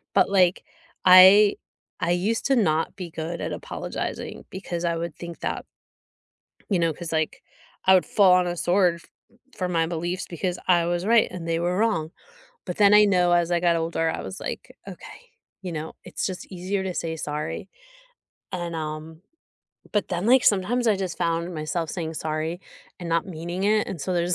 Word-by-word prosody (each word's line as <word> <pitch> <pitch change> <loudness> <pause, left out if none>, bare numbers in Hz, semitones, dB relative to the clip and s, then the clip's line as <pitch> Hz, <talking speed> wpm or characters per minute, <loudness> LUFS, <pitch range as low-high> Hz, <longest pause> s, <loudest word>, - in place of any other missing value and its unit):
But - - +4
like 185 -2 +3 0.4
I 190 +3 +8 0.4
I 175 - 0
used 195 +6 0
to 275 - +3
not 165 -8 +1
be 180 -3 -7
good 165 +2 -5
at - - -3
apologizing - - -5
because 175 -2 -4
I 170 0 0
would 165 -1 -4
think 170 0 -9
that - - -3 1.0
you 195 -4 +2
know, 165 -1 +1
'cause 165 +2 -7
like 160 -1 -1 0.4
I 190 - +7
would 185 - +3
fall 195 -3 +5
on 180 0 +3
a 175 - -2
sword 180 0 +2
f 170 - -15 0.5
for 185 - -1
my 165 -2 +1
beliefs 175 +2 -3
because 180 +1 -3
I 175 -2 +4
was 175 +1 -1
right 230 +1 +4
and 170 -2 -7
they 165 0 0
were 175 +2 0
wrong. 175 -8 0 0.6
But 180 - -4
then 205 0 +6
I 210 0 +8
know 180 -3 +3
as 175 0 +2
I 175 -1 +2
got 170 -1 +3
older, 165 0 0
I - - -5
was 190 - -7
like, - - -6
"Okay, - - -12 0.3
you 180 -2 -5
know, 160 0 -5
it's 180 - -3
just 185 -2 -6
easier 190 +2 -2
to 190 -1 -4
say 165 -1 -3
sorry." 150 0 -4 0.8
And, 175 -2 -4
um, 155 +1 -6 0.7
but 210 - 0
then 180 +2 -2
like 255 +2 +5
sometimes 220 +5 +2
I 210 - +3
just 190 -3 -4
found 170 +1 -1
myself 155 +1 -3
saying 165 -3 -4
"sorry" 155 +2 -3 0.4
and 175 - -5
not 165 +1 +1
meaning 175 +1 -5
it, 215 +1 +2
and 175 - -6
so 185 - -2
there's 175 0 +1
175 Hz, 190 wpm, -24 LUFS, 165-190 Hz, 1.0 s, I